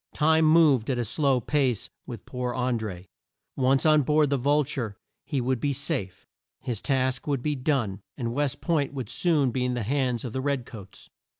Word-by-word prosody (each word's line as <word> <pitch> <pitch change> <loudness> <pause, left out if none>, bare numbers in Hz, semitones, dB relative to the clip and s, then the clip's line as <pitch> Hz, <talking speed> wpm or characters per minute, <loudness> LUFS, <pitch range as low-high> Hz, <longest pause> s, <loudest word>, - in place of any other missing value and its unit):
Time 160 +1 +4
moved 155 -7 +4
at 130 - 0
a 120 - -1
slow 135 +2 +1
pace 130 -2 0 0.2
with - - -8
poor 125 -1 -4
An 125 -2 0
dré. 95 -5 -6 0.5
Once 135 +1 +2
on 155 -1 +6
board 150 +1 +2
the - - +3
Vul 145 +4 +2
ture 120 -7 -4 0.3
he 145 -4 -1
would 125 0 0
be 140 +3 0
safe; 130 - -3 0.3
his 115 -5 -4
task 130 -1 0
would 140 -4 -1
be 150 - 0
done, 125 -8 -1 0.2
and 115 -3 -3
West 145 0 -1
Point 145 -5 0
would 130 -6 -4
soon 150 -7 +2
be 125 +1 -1
in 125 0 -1
the 120 - -2
hands 125 0 -1
of 120 - -5
the 130 - -2
red 140 -3 -1
coats. 100 -5 -12
130 Hz, 200 wpm, -26 LUFS, 120-145 Hz, 0.5 s, on